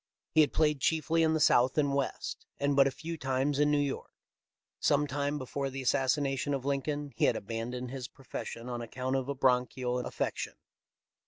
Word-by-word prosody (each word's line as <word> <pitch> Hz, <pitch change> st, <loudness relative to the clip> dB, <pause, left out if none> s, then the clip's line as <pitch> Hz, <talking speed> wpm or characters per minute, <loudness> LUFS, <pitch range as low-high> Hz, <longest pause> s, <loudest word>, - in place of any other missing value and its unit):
He 160 Hz, -, +6 dB
had 150 Hz, -, +3 dB
played 150 Hz, -2 st, +2 dB
chiefly 160 Hz, +3 st, +2 dB
in 160 Hz, 0 st, +3 dB
the -, -, +1 dB
South 130 Hz, -2 st, +4 dB
and 145 Hz, -2 st, +2 dB
West, 140 Hz, -1 st, -3 dB
and 140 Hz, 0 st, +1 dB
but 135 Hz, 0 st, +6 dB
a -, -, +3 dB
few 165 Hz, +4 st, -6 dB
times 135 Hz, +2 st, 0 dB
in 150 Hz, 0 st, +4 dB
New 150 Hz, -, +3 dB
York. 140 Hz, -2 st, -2 dB, 0.7 s
Some 145 Hz, 0 st, +3 dB
time 145 Hz, +1 st, -1 dB
before 135 Hz, +1 st, -3 dB
the 135 Hz, 0 st, -5 dB
assassination 135 Hz, +2 st, +1 dB
of 135 Hz, -1 st, -5 dB
Lincoln 145 Hz, +1 st, -1 dB
he -, -, +3 dB
had -, -, +3 dB
abandoned 120 Hz, +4 st, -4 dB
his 130 Hz, -2 st, -5 dB
profession 125 Hz, -2 st, -7 dB
on 120 Hz, -1 st, -3 dB
account 130 Hz, +3 st, -3 dB
of 135 Hz, 0 st, -1 dB
a 140 Hz, -, -1 dB
bronchial 125 Hz, -1 st, +1 dB
affection. 125 Hz, -, -3 dB
135 Hz, 185 wpm, -31 LUFS, 130-145 Hz, 0.7 s, He